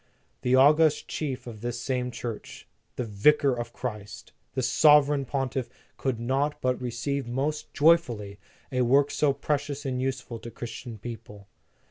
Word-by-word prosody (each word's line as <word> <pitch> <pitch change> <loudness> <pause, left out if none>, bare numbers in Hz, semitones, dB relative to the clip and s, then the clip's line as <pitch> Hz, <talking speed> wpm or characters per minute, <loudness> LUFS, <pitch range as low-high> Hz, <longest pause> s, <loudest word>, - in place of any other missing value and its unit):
"The 125 +1 +3
august 150 +3 +5
Chief 130 -5 -4
of 110 -3 -9
this 120 0 -3
same 125 -1 -1
Church, 120 -2 -7 0.3
the - - -2
Vicar 130 +6 +3
of 120 -1 -4
Christ, 105 -7 -7 0.2
the - - 0
Sovereign 145 -2 +5
Pontiff, 130 -1 -2 0.3
could 130 -4 -2
not 135 +5 0
but 125 -1 0
receive 125 +3 -2
most 140 +5 -2
joyfully, 120 -11 +2 0.3
a 125 -1 +1
work 140 +4 +4
so 150 -2 +2
precious 145 0 -2
and 130 -1 -1
useful 130 -3 -3
to 120 - -8
Christian 120 0 -7
people. 105 -3 -9
130 Hz, 145 wpm, -27 LUFS, 120-140 Hz, 0.3 s, august